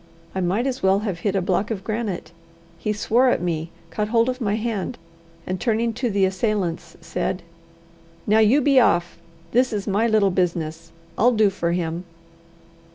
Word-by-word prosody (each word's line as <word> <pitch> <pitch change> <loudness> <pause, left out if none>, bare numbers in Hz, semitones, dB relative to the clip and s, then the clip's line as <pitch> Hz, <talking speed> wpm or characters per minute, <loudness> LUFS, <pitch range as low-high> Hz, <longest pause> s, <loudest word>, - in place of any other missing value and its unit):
I 190 - -2
might 190 +7 0
as 265 -1 -2
well 190 +1 +3
have 195 -6 -3
hit 200 +2 -1
a 190 - +1
block 200 +4 0
of 205 -5 -4
granite. 210 -7 -3 0.5
He 210 - -1
swore 235 +4 +3
at - - +2
me, 165 -2 -2 0.2
caught 210 +4 -1
hold 230 +2 +2
of 255 +1 -4
my 205 -2 +1
hand, 225 0 -3 0.5
and 185 0 -3
turning 230 0 +1
to 245 +2 -1
the 200 -2 +2
assailants 190 -4 -2
said: 170 +2 -3 0.8
"Now, 215 +1 +4
you 225 +7 +5
be 275 -1 +5
off! 175 -7 +2 0.3
This 250 +2 +3
is 205 -2 -2
my 210 +3 +1
little 215 -3 +3
business. 165 -2 -2 0.3
I'll 245 +4 +5
do 215 -3 +3
for 170 -3 -1
him!" 170 0 -2
205 Hz, 175 wpm, -23 LUFS, 180-230 Hz, 0.8 s, you